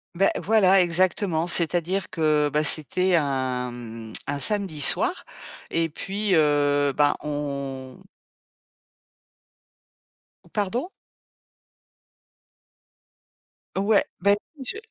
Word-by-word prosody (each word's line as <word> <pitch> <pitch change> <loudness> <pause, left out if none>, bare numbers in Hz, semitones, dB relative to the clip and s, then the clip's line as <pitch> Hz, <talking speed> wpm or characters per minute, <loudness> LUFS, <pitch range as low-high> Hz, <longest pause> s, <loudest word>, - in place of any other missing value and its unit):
Beh 195 +3 +3
voilà 195 -3 +4
exactement, 175 -1 +1
c'est-à-dire 175 +2 0
que 150 -2 +1
bah 150 +1 +1
c'était 170 +5 0
un, 130 -4 -1
mmh, 115 -2 -9
un 140 - -3
samedi 195 -5 +1
soir 360 - +2 0.5
et 165 0 0
puis, 195 +6 -4
heu, 145 -2 +2
bah 145 -1 +3
on 140 -2 -5 2.4
On - - -22
pardon? 225 - -2 2.9
Ouais, 200 +2 +3 0.2
bah, 200 0 +4 0.2
oui, 265 - -9
je 380 - -4
160 Hz, 95 wpm, -24 LUFS, 145-195 Hz, 2.9 s, voilà